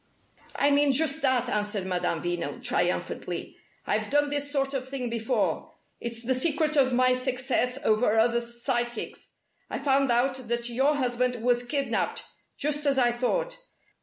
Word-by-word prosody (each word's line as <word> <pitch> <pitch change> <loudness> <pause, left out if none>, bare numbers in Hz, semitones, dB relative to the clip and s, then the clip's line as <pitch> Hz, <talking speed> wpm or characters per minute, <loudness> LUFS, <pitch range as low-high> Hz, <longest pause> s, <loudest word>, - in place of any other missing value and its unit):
"I 285 +1 +3
mean 285 -1 +4
just 310 +2 +2
that," 255 -3 +2
answered 210 -3 -1
Madame 180 -3 -1
Veno, 175 -1 -3
triumphantly. - - -2 0.3
"I've - - -1
done 290 0 +2
this 285 0 -2
sort 275 -1 0
of 260 -1 -3
thing 255 -3 -4
before. 230 -1 -1 0.3
It's 235 0 -4
the 260 - +2
secret 305 +3 +1
of 265 -3 +4
my 255 +1 +4
success 255 0 0
over 220 0 +3
other 235 +1 +3
psychics. 240 0 -4 0.4
I've - - -4
found 275 -2 +3
out 255 +1 +1
that 235 +1 -1
your 270 +5 +2
husband 250 -2 0
was 245 0 +3
kidnapped, 275 +3 -1 0.3
just 295 0 0
as 275 -1 +3
I 245 -2 +4
thought. - - -1
255 Hz, 155 wpm, -27 LUFS, 235-280 Hz, 0.4 s, mean